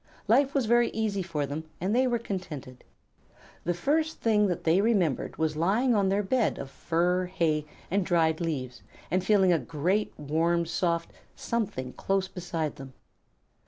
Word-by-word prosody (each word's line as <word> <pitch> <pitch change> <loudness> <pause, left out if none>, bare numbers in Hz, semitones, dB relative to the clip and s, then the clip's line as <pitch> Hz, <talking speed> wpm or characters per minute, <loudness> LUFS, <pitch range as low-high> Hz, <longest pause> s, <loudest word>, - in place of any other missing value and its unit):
Life 270 +6 +3
was 270 -4 +2
very 240 +1 +4
easy 215 -3 -1
for 160 -5 -2
them, 145 +3 -5
and 195 +6 0
they 260 +1 +3
were 240 -1 +1
contented. 165 - -6 0.8
The 175 +1 0
first 310 - 0
thing 210 -2 +3
that 175 -3 -2
they 170 +4 +4
remembered 195 - +1
was 160 -1 0
lying 210 +11 +2
on 200 -3 +2
their 200 +2 +1
bed 230 +3 +1
of 135 - -7
fur, 180 +4 0
hay, 160 -5 0 0.2
and 195 +1 +2
dried 165 -2 +2
leaves, 130 -7 -3 0.3
and 185 0 +1
feeling 190 -3 +4
a 165 - +2
great, 175 +8 -1
warm, 165 +3 +1
soft 170 0 -1 0.2
Something 160 - -3
close 195 -1 0
beside 170 -4 -4
them. 135 -1 -10
180 Hz, 160 wpm, -28 LUFS, 160-210 Hz, 0.8 s, very